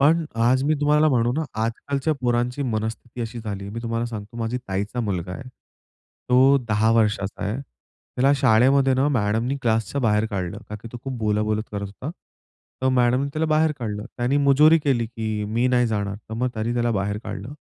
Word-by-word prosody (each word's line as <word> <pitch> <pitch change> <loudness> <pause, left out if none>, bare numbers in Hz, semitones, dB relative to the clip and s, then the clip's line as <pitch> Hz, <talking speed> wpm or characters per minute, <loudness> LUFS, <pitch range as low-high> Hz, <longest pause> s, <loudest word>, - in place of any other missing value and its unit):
पण 160 +4 +4 0.2
आज 130 +2 +3
मी 155 - +2
तुम्हाला 150 +1 +4
म्हणू 120 -3 +2
ना, 160 +4 -1 0.2
आजकालच्या 135 +6 -1
पोरांची 120 +2 0
मनस्थिती 115 0 -4
अशी 115 +1 -4
झाली. 100 -3 -5
मी 115 +3 -5
तुम्हाला 115 0 -2
सांगतो, 110 -1 -8
माझी 115 +1 -2
ताईचा 100 +5 -2
मुलगा 90 -5 -3
आहे. 125 +7 -8 0.8
तो 130 +3 +6
10 110 +1 +3
वर्षाचा 105 -3 +1
आहे. 105 +3 -2
त्याला 135 0 -3
शाळेमध्ये 130 +2 +4
ना 130 +2 +2
मॅडमनी 115 0 0
क्लासच्या 115 +3 0
बाहेर 105 -2 +2
काढलं, 95 -4 -3
का 105 - -6
की 115 - -8
तो - - -5
खूप 130 -2 -4
बोला-बोलत 105 0 0
करत 100 -1 -3
होता. 105 +9 -7 0.7
तर 130 - +3
मॅडमनी 125 +1 +2
त्याला 155 +2 0
बाहेर 155 0 +3
काढलं. 105 -4 -4
त्याने 125 +3 +1
मुजोरी 145 +3 +5
केली, 135 -6 0
की 110 -2 -3
मी 115 +4 0
नाही 125 -1 +3
जाणार. 100 -3 -2
तर 110 - -5
मग 125 +3 0
तरी 110 +2 -1
त्याला 120 0 +1
बाहेर 100 +1 -2
काढलं. 135 - -6
120 Hz, 185 wpm, -23 LUFS, 110-135 Hz, 0.8 s, तो